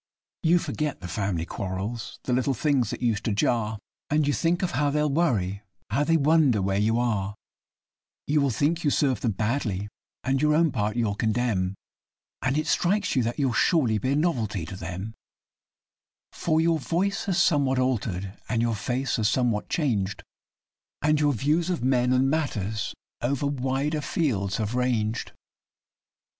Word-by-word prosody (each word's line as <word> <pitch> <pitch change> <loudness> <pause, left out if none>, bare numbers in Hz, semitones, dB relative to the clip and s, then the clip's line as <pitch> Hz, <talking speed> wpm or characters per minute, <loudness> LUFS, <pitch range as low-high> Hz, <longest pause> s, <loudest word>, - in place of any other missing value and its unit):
You 170 0 +4
forget 150 -3 -2
the 95 - -7
family 95 -4 -2
quarrels 100 +6 -4
little 130 +2 +1
things 135 -1 +1
that - - -5
used 110 -4 +1
to 115 - +1
jar 110 +1 +1 0.3
And 150 0 +2
you 145 - +1
think 170 +4 +1
of 180 - 0
how 145 -3 +1
they'll 150 0 +1
worry 110 - +1 0.3
how 135 +7 +2
they 165 +2 +3
wonder 150 -6 +4
where 95 +1 0
you 110 +2 +2
are; 105 -4 0 0.9
You 150 0 +2
will 140 - +2
think 150 +8 0
you 150 - +3
served 135 -5 +1
them 115 - 0
badly, 105 -2 -1 0.3
and 135 0 +1
your 150 0 +3
own 165 -1 +3
part 105 -1 -1
you'll 115 -4 +1
condemn, 105 -4 0 0.7
And 130 +2 +1
it 155 - 0
strikes 195 +1 +1
you 130 - +3
that 120 +1 -2
you'll 135 -4 +1
surely 125 -11 +3
be 130 +4 0
a - - +1
novelty 115 - 0
to 95 - -7
them, 90 +4 -6 1.2
For 160 -1 0
your 165 0 +2
voice 190 +8 -1
has 190 -4 +1
somewhat 140 -6 +3
altered, 100 -7 -1 0.2
and 115 - +1
your 115 0 +1
face 125 +6 -1
has 110 -2 +2
somewhat 120 -3 0
changed 105 - -1 0.8
And 150 0 +3
your 145 -1 +3
views 155 - +1
of 175 -8 -1
men 125 -1 +2
and 130 +1 +3
matters 110 - -1 0.3
over 140 +3 0
wider 140 +2 -1
fields 110 - -1
have 110 0 -2
ranged. 120 -3 0
125 Hz, 165 wpm, -26 LUFS, 105-150 Hz, 1.2 s, You